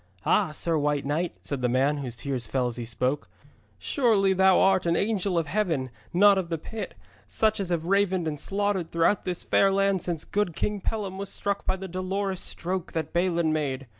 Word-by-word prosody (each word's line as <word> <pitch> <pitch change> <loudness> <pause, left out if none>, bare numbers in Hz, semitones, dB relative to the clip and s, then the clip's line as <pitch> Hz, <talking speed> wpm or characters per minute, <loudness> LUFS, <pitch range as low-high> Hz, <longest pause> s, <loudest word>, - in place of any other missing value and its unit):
'Ah, - - +3
Sir 160 +1 0
White 145 -1 0
Knight!' 160 +5 -1
said 140 -3 -4
the 125 - +1
man, 135 +4 +2
whose 130 -4 -5
tears 125 -2 -3
fell 130 +1 0
as 120 -1 -2
he 120 -1 -5
spoke, 125 +4 -1 0.5
'surely 215 -8 +2
thou 190 0 +5
art 190 -2 +3
an 170 - +2
angel 195 -2 0
of 165 - +1
heaven, 160 - -1 0.2
not 200 +2 +6
of 175 -3 -4
the 165 - -1
pit, 215 +8 -7 0.3
such 220 -1 +1
as 195 -3 -2
have 170 -2 -1
ravened 190 -2 +2
and 150 -2 -3
slaughtered 195 -3 -1
throughout 170 +5 +2
this 180 -1 -3
fair 195 - +3
land 195 -1 +2
since 165 -3 -3
good 205 -5 -1
King 210 -1 -1
Pellam 195 -3 -3
was 200 0 -4
struck 200 0 -3
by 190 - +2
the 190 0 -7
Dolorous 190 +1 -2
Stroke 180 0 -3
that 160 -2 -3
Balin 170 -2 +1
made. 135 -3 -2
180 Hz, 200 wpm, -26 LUFS, 150-195 Hz, 0.5 s, not